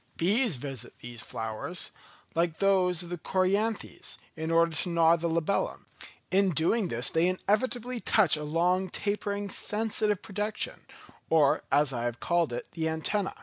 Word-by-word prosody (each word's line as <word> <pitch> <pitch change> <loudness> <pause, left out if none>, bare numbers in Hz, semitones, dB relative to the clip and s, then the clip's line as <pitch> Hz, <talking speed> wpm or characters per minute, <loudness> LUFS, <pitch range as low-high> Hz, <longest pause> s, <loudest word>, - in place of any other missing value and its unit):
Bees 205 - +2
visit 130 -2 -6
these 120 -1 -5
flowers, 115 +12 -4 0.4
like 165 -1 0
those 185 -3 +2
of 170 - -10
the 175 -1 -5
Coryanthes, 200 +6 -1 0.2
in 160 0 -4
order 165 0 +4
to 180 - +1
gnaw 165 -1 +5
the 170 0 -2
labellum; 170 +4 -1 0.5
in 195 +1 +4
doing 180 +6 +1
this 120 -4 0
they 165 +2 +3
inevitably 240 +6 -1
touch 210 -7 +4
a 150 - -5
long, 180 +5 +1
tapering, 205 +1 -2
sensitive 210 0 0
projection, 210 0 -3 0.4
or, 150 -4 +4
as 145 -1 +3
I 120 -1 -2
have 120 0 -3
called 170 -5 +1
it, 120 - -5
the 160 -1 -2
antenna. 190 +5 -1
175 Hz, 150 wpm, -29 LUFS, 160-200 Hz, 0.5 s, gnaw